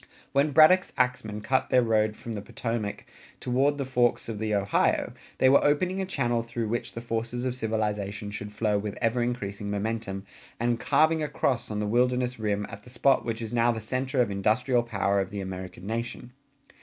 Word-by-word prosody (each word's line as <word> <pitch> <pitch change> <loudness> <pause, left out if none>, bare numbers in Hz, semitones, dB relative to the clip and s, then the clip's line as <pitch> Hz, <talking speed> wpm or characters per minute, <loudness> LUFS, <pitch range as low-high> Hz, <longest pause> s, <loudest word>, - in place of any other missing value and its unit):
When 140 +2 +3
Braddock's 155 +6 +6
axmen 115 -4 0
cut 130 +4 0
their 125 -1 +4
road 110 -2 +2
from 115 - -7
the 105 - -4
Potomac 115 -1 -4 0.3
toward 135 +4 +1
the 140 - -2
forks 125 -2 +1
of 110 -3 -4
the 110 -1 0
Ohio 100 0 +1 0.2
they 130 - +4
were 135 +2 +6
opening 180 +6 +2
a 190 - -3
channel 120 -9 0
through 115 -1 -4
which 120 +2 -3
the 115 - -6
forces 115 +1 -3
of 130 - 0
civilization 105 -3 -2
should 105 0 -6
flow 105 -1 0
with 105 0 -5
ever 120 +1 +1
increasing 105 -4 -3
momentum 100 -1 -3 0.3
and 120 0 +1
"carving 155 +3 +3
a 150 - 0
cross 130 -4 -1
on 105 -1 -3
the 105 - -1
wilderness 125 +2 +1
rim" 105 -1 -1
at 100 - -9
the 125 - -15
spot 130 +2 +2
which 115 -1 -3
is 110 +1 -6
now 120 0 +3
the 115 - -3
center 130 +4 -2
of 110 -4 +1
industrial 115 +5 +2
power 100 -4 0
of 95 - -4
the 100 - -5
American 95 -1 -7
nation. 115 +3 -4
115 Hz, 195 wpm, -27 LUFS, 105-125 Hz, 0.3 s, Braddock's